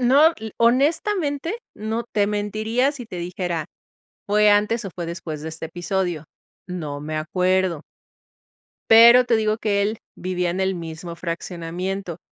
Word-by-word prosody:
no, 280 Hz, +6 st, +6 dB
l 220 Hz, -1 st, -8 dB
honestamente, 295 Hz, -, +1 dB, 0.2 s
no. 220 Hz, +2 st, -3 dB
Te 205 Hz, -3 st, 0 dB
mentiría 215 Hz, +6 st, 0 dB
si 265 Hz, -4 st, -8 dB
te 185 Hz, -, -8 dB
dijera, 175 Hz, -2 st, -3 dB, 0.6 s
fue 210 Hz, +1 st, +4 dB
antes, 210 Hz, +3 st, +2 dB
o, -, -, -4 dB
fue 175 Hz, -2 st, -5 dB
después 165 Hz, -3 st, -6 dB
de 160 Hz, -, -5 dB
este 160 Hz, 0 st, -6 dB
episodio. 175 Hz, -2 st, -2 dB, 0.4 s
No 155 Hz, -6 st, -5 dB
me 155 Hz, +1 st, -4 dB
acuerdo. 180 Hz, 0 st, 0 dB, 1.1 s
Pero 235 Hz, +2 st, +9 dB
te 235 Hz, -2 st, +2 dB
digo 215 Hz, 0 st, +1 dB
que 205 Hz, -3 st, 0 dB
él 215 Hz, +2 st, -1 dB, 0.2 s
vivía 180 Hz, -1 st, -1 dB
en 180 Hz, +2 st, -3 dB
el 190 Hz, 0 st, +1 dB
mismo 170 Hz, 0 st, -7 dB
fraccionamiento. 175 Hz, +1 st, -4 dB
190 Hz, 145 wpm, -22 LUFS, 170-225 Hz, 1.1 s, Pero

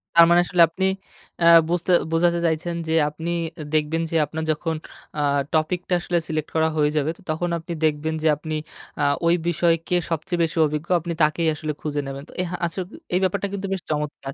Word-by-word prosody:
তার 170 Hz, 0 st, +9 dB
মানে 175 Hz, 0 st, +6 dB
আসলে 175 Hz, -1 st, +2 dB
আপনি 190 Hz, +3 st, -2 dB, 0.6 s
আ -, -, +5 dB, 0.2 s
বুঝতে 175 Hz, +1 st, 0 dB, 0.2 s
বোঝাতে 170 Hz, +1 st, +2 dB
চাইছেন 170 Hz, +1 st, -1 dB
যে 160 Hz, -, 0 dB, 0.2 s
আপনি 160 Hz, +3 st, -6 dB, 0.4 s
দেখবেন 155 Hz, +1 st, +1 dB
যে -, -, -2 dB
আপনার 160 Hz, +2 st, -5 dB
যখন 160 Hz, +1 st, -2 dB, 0.4 s
আ -, -, -1 dB, 0.3 s
টপিকটা 175 Hz, +3 st, 0 dB
আসলে 175 Hz, 0 st, -1 dB
সিলেক্ট 155 Hz, -1 st, -3 dB
করা 160 Hz, 0 st, +3 dB
হয়ে 150 Hz, -1 st, +3 dB
যাবে 150 Hz, +1 st, +1 dB, 0.2 s
তখন 160 Hz, +3 st, -1 dB
আপনি 170 Hz, +1 st, -6 dB
দেখবেন 155 Hz, +1 st, 0 dB
যে -, -, +3 dB
আপনি 155 Hz, +2 st, -6 dB, 0.5 s
আ -, -, +1 dB, 0.2 s
ওই 170 Hz, +1 st, +5 dB
বিষয়কে 170 Hz, +1 st, +1 dB
সবচেয়ে 170 Hz, +2 st, -2 dB
বেশি 165 Hz, 0 st, -2 dB
অভিজ্ঞ। 150 Hz, +2 st, -3 dB
আপনি 170 Hz, +1 st, -4 dB
তাকেই 155 Hz, +2 st, +2 dB
আসলে 155 Hz, 0 st, -3 dB
খুঁজে 150 Hz, -1 st, -2 dB
নেবেন। 135 Hz, 0 st, -6 dB
তো -, -, -13 dB
এ -, -, 0 dB
হা -, -, -2 dB
আচ্ছা 170 Hz, +2 st, -4 dB, 0.3 s
এই 180 Hz, -, +3 dB
ব্যাপারটা 200 Hz, +2 st, 0 dB
কিন্তু 200 Hz, 0 st, -3 dB
বেশ 190 Hz, -, -3 dB
চমৎকার।। 150 Hz, -2 st, -3 dB
165 Hz, 195 wpm, -23 LUFS, 155-175 Hz, 0.6 s, তার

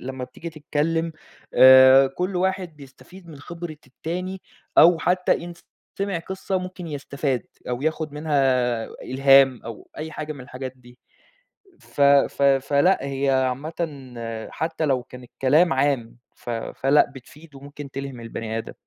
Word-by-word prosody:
لمّا 130 Hz, 0 st, -6 dB
بتيجي 165 Hz, +6 st, -9 dB
تتكلّم 160 Hz, +2 st, -2 dB, 0.4 s
آآ 130 Hz, +1 st, +8 dB
كل 180 Hz, +8 st, -3 dB
واحد 185 Hz, -3 st, -1 dB
بيستفيد 150 Hz, +6 st, -15 dB
من 155 Hz, -, -10 dB
خبرة 170 Hz, +2 st, -8 dB
التاني، 180 Hz, +8 st, -5 dB, 0.4 s
أو 170 Hz, 0 st, +7 dB
حتّى 180 Hz, +1 st, +1 dB
إن 175 Hz, -, -7 dB, 0.5 s
سمع 195 Hz, -3 st, -1 dB
قصة 190 Hz, +2 st, -3 dB
ممكن 185 Hz, -1 st, -7 dB
يستفاد 140 Hz, -3 st, -3 dB, 0.2 s
أو 125 Hz, +1 st, -3 dB
ياخُد 155 Hz, -1 st, -2 dB
منها 150 Hz, 0 st, -3 dB, 0.7 s
إلهام 135 Hz, -1 st, +4 dB
أو 115 Hz, -2 st, -9 dB
أي 155 Hz, 0 st, -6 dB
حاجة 155 Hz, 0 st, -5 dB
من 140 Hz, -, -11 dB
الحاجات 130 Hz, 0 st, -7 dB
دي. 125 Hz, -1 st, -19 dB, 0.8 s
ف -, -, -11 dB
ف 140 Hz, 0 st, +4 dB
فلأ. 140 Hz, +5 st, +3 dB
هي 140 Hz, 0 st, -1 dB
عامةً 130 Hz, +4 st, 0 dB, 0.8 s
حتّى 160 Hz, 0 st, -3 dB
لو 135 Hz, -4 st, +1 dB
كان 125 Hz, 0 st, -13 dB
الكلام 140 Hz, +7 st, +2 dB
عام، 135 Hz, -4 st, 0 dB, 0.2 s
ف -, -, -9 dB
فلأ 135 Hz, +5 st, +1 dB
بتفيد 145 Hz, +4 st, -15 dB
وممكن 140 Hz, +1 st, -10 dB
تلهم 135 Hz, -2 st, -6 dB
البني 115 Hz, -1 st, -5 dB
آدم. 115 Hz, -, -7 dB
140 Hz, 140 wpm, -23 LUFS, 130-165 Hz, 0.8 s, آآ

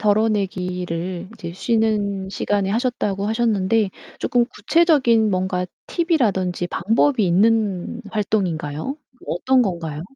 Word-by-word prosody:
덜어내기를 185 Hz, -4 st, -1 dB
이제 170 Hz, -6 st, -7 dB
쉬는 205 Hz, -2 st, 0 dB
시간에 200 Hz, -1 st, -1 dB
하셨다고 210 Hz, -4 st, -1 dB
하셨는데 220 Hz, -2 st, +1 dB, 0.3 s
쪼끔 240 Hz, -1 st, +2 dB
구체적인 245 Hz, -, +3 dB
뭔가 185 Hz, -1 st, -1 dB, 0.2 s
팁이라든지 210 Hz, -, 0 dB
방법이 225 Hz, +4 st, +2 dB
있는 210 Hz, +2 st, +1 dB
활동인가요? 190 Hz, -, -2 dB, 0.3 s
어떤 255 Hz, +9 st, +2 dB
건가요? 165 Hz, -6 st, -3 dB
205 Hz, 285 characters per minute, -21 LUFS, 180-230 Hz, 0.3 s, 구체적인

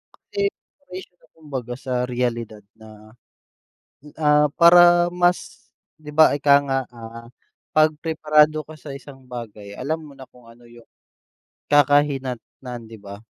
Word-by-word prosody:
kasi 405 Hz, -2 st, -3 dB
preparation 190 Hz, -, -12 dB
na -, -, -26 dB
kumbaga 130 Hz, -6 st, -7 dB
sa 130 Hz, 0 st, -6 dB
realidad 120 Hz, -4 st, -3 dB, 0.2 s
na, 110 Hz, 0 st, -15 dB, 1.0 s
ah, 150 Hz, -1 st, +3 dB
para 175 Hz, 0 st, +6 dB
mas 175 Hz, 0 st, -1 dB, 0.3 s
'di 150 Hz, -1 st, -11 dB
ba 155 Hz, 0 st, +6 dB
ika 140 Hz, 0 st, +4 dB
nga, 135 Hz, -1 st, -1 dB, 0.2 s
ah, 115 Hz, 0 st, -11 dB, 0.5 s
kapag 155 Hz, -1 st, +3 dB
preparado 155 Hz, -1 st, +2 dB
ka 155 Hz, 0 st, -14 dB
sa 140 Hz, -2 st, -9 dB
isang 135 Hz, -2 st, -13 dB
bagay 110 Hz, -5 st, -9 dB
alam 155 Hz, +8 st, -3 dB
mo 140 Hz, -, -14 dB
na 130 Hz, -1 st, -13 dB
kung 125 Hz, -2 st, -20 dB
ano 115 Hz, +1 st, -18 dB
yung 120 Hz, -1 st, -17 dB, 0.9 s
kakahinatnan 135 Hz, -4 st, 0 dB
'di 110 Hz, -2 st, -13 dB
ba. 100 Hz, 0 st, -11 dB
140 Hz, 135 wpm, -21 LUFS, 120-155 Hz, 1.0 s, para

